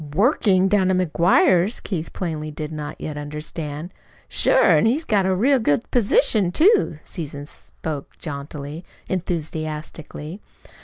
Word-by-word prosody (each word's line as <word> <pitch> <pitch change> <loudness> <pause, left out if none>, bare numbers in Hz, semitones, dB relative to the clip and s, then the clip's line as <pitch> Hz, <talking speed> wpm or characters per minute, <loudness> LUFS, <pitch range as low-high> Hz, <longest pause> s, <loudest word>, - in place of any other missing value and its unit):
"WORKING! 195 - +3
Down 190 -1 +3
to 190 - +2
MCGUIRE'S!" 180 +3 +3
Keith 170 -5 -4
plainly 155 -4 -4
did 150 +1 -6
not 150 -1 -6
yet 150 -1 -5
understand. 150 +2 -6 0.3
"Sure! - - +4
An' - - +4
he's 290 +8 +1
got 200 -4 +2
a 190 - +2
real 260 +8 +3
good 220 -1 0
position, 220 - +3
too." 380 - +3
Susan 145 -3 -6
spoke 150 0 -7
jauntily, 145 +1 -6 0.2
enthusiastically. 160 -1 -5
170 Hz, 125 wpm, -22 LUFS, 150-200 Hz, 0.3 s, Sure